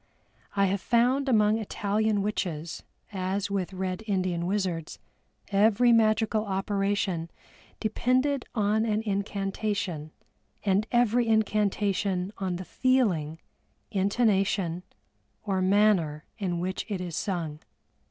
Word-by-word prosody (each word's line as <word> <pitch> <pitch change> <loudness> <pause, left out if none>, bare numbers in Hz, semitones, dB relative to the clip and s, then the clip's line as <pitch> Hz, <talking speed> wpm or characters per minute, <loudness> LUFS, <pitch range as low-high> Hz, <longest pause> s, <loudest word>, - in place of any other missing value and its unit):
I 200 -1 +4
have 195 0 0
found 255 +4 +2
among 215 -2 +4
Italian 210 0 0
witches 170 -6 -3 0.3
as 190 +1 -2
with 195 -2 -1
Red 185 0 -3
Indian 185 -3 0
wizards, 185 -5 -2 0.5
every 220 +4 +4
magical 220 -1 +3
operation 195 -3 -1 0.5
depended 255 +5 +1
on 215 0 +2
an 215 -1 0
incantation, 195 -5 -2 0.5
and 200 +2 +2
every 240 -1 +3
incantation 205 -3 +1
on 185 -2 -1
the 185 +1 -6
feeling, 185 - +1 0.5
intonation, 195 -4 +1 0.6
or 195 -2 0
manner 185 -6 +3
in 180 -4 -1
which 185 +2 -2
it 200 -3 -2
is 175 -3 -5
sung. 165 -5 -3
200 Hz, 105 wpm, -27 LUFS, 185-215 Hz, 0.6 s, I